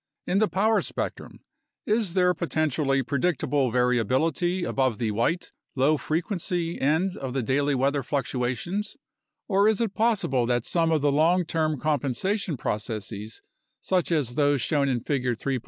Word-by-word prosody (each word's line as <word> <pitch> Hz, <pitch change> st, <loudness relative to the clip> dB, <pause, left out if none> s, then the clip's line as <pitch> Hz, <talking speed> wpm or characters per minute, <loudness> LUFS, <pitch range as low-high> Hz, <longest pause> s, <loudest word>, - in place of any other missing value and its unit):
In 190 Hz, +2 st, +1 dB
the 215 Hz, -, +3 dB
power 205 Hz, +6 st, +2 dB
spectrum -, -, -5 dB, 0.4 s
is 210 Hz, -4 st, 0 dB
there 180 Hz, -1 st, +4 dB
potentially 155 Hz, -5 st, 0 dB
predictable 140 Hz, -1 st, 0 dB
variability 130 Hz, -, +1 dB
above 130 Hz, -8 st, 0 dB
the 110 Hz, -1 st, -1 dB
"white," 120 Hz, -, -1 dB, 0.2 s
low 140 Hz, +4 st, +3 dB
frequency 170 Hz, +1 st, -2 dB
end 160 Hz, +7 st, +1 dB
of 130 Hz, -2 st, -5 dB
the 130 Hz, -2 st, -1 dB
daily 140 Hz, +3 st, +1 dB
weather 140 Hz, +2 st, +1 dB
fluctuations, 140 Hz, -, -2 dB, 0.5 s
or 200 Hz, 0 st, +3 dB
is 220 Hz, -2 st, +2 dB
it 225 Hz, -4 st, -1 dB
possible 210 Hz, -, +1 dB
that 120 Hz, -1 st, 0 dB
some 165 Hz, -2 st, +1 dB
of 155 Hz, -2 st, +2 dB
the 145 Hz, -, +3 dB
long 165 Hz, +5 st, +3 dB
term 155 Hz, -3 st, -1 dB
compensation 155 Hz, -, -1 dB
processes, 105 Hz, -1 st, -4 dB, 0.4 s
such 180 Hz, -2 st, 0 dB
as 145 Hz, -7 st, 0 dB
those 145 Hz, 0 st, +2 dB
shown 140 Hz, +2 st, +1 dB
in 125 Hz, -3 st, 0 dB
Figure 125 Hz, -2 st, -1 dB
3. 130 Hz, +3 st, -2 dB
145 Hz, 150 wpm, -26 LUFS, 130-180 Hz, 0.5 s, there